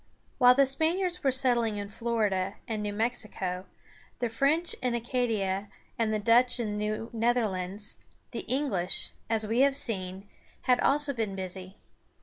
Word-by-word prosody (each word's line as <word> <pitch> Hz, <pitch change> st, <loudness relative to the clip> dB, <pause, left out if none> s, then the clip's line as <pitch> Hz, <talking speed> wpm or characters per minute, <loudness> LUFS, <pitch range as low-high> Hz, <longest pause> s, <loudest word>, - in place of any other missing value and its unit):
While 250 Hz, -1 st, +7 dB
the 275 Hz, +1 st, +5 dB
Spaniards 345 Hz, +6 st, +1 dB
were 270 Hz, -, +3 dB
settling 240 Hz, -5 st, +1 dB
in 205 Hz, 0 st, -4 dB
Florida 205 Hz, -4 st, -1 dB
and 220 Hz, -3 st, -3 dB
New 210 Hz, 0 st, -2 dB
Mexico, 205 Hz, -4 st, -2 dB, 0.5 s
the 240 Hz, -, -1 dB
French 290 Hz, +9 st, +1 dB
in 250 Hz, -2 st, 0 dB
Acadia, 220 Hz, -5 st, -1 dB, 0.3 s
and 225 Hz, -2 st, 0 dB
the 215 Hz, -, +1 dB
Dutch 240 Hz, +4 st, +4 dB
in 220 Hz, -3 st, -2 dB
the -, -, -3 dB
New 215 Hz, +2 st, -3 dB
Netherlands, 210 Hz, -4 st, -1 dB, 0.3 s
the -, -, -4 dB
English, 250 Hz, -10 st, +1 dB, 0.2 s
as 220 Hz, -1 st, +2 dB
we 225 Hz, +3 st, 0 dB
have 275 Hz, 0 st, +5 dB
seen, 190 Hz, -5 st, 0 dB, 0.4 s
had 250 Hz, -1 st, +3 dB
also 290 Hz, 0 st, +2 dB
been 220 Hz, -5 st, -3 dB
busy. 185 Hz, 0 st, -7 dB
225 Hz, 150 wpm, -28 LUFS, 205-250 Hz, 0.5 s, While